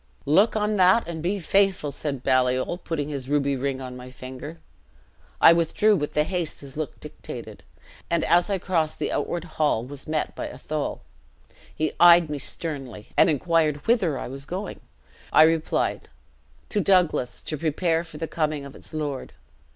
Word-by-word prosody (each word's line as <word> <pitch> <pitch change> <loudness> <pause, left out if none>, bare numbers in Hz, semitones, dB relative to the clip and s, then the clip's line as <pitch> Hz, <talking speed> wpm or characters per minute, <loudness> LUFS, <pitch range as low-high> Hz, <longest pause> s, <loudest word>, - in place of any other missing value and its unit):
"'Look 195 +12 +4
on 210 0 0
that, 185 +4 +5
and 165 -2 -5
be 185 +5 0
faithful!' 195 -4 +2
said 140 -3 -4
Baliol, 130 +5 +1
putting 150 -4 -3
this 135 -3 -5
ruby 140 -1 +1
ring 135 0 -2
on 130 -1 -7
my 125 0 -9
finger. 130 +5 -9 0.8
I 165 - +8
withdrew, 170 +6 +3
with 150 -5 -3
the 150 - +3
haste 175 -1 -3
his 140 -2 -10
look 155 -2 -5
dictated; - - -9 0.5
and 170 -1 +1
as 175 +3 +3
I 200 - +1
crossed 165 -4 -1
the - - -2
outward 175 -2 -2
hall, 150 -8 0
was 140 +1 -9
met 155 -1 -2
by - - -4
Athol. 155 -1 -4 0.7
He 155 -1 -1
eyed 170 -2 +7
me 145 - -3
sternly, 135 -7 -5
and - - +5
inquired 155 -1 +1
whither 195 - +2
I - - -5
was 135 +2 -7
going. 190 +5 -5 0.5
I 155 - +7
replied, 160 0 +1 0.6
'To 210 - +1
Douglas, 180 -10 +2
to 155 - -3
prepare 165 +2 0
for 165 -3 -11
the 165 +1 -3
coming 155 -3 -2
of 140 - -11
its - - -10
lord.' 145 -3 -4
155 Hz, 170 wpm, -25 LUFS, 140-175 Hz, 0.8 s, I